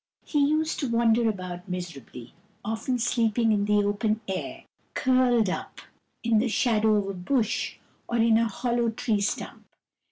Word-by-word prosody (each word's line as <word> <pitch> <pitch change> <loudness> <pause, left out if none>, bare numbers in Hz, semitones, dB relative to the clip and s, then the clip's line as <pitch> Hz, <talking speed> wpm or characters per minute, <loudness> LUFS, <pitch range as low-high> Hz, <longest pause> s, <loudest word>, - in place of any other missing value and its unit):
He 295 - 0
used 310 +2 +1
to 275 - -2
wander 230 0 +3
about 185 -3 -6
miserably, 165 -9 -7 0.3
often 225 +4 -1
sleeping 230 -1 +1
in 205 -1 +2
the 210 0 +3
open 210 +1 0
air, 190 -1 -4 0.3
curled 255 -4 +3
up 185 - -4 0.4
in 230 -2 +3
the 240 +3 +1
shadow 220 -1 +2
of 205 -1 0
a 195 - -3
bush, 215 +5 -1 0.3
or 235 - -1
in 230 -1 +4
a 230 - +2
hollow 235 +2 0
tree 220 -2 -1
stump. 200 - -4
225 Hz, 155 wpm, -26 LUFS, 205-240 Hz, 0.4 s, in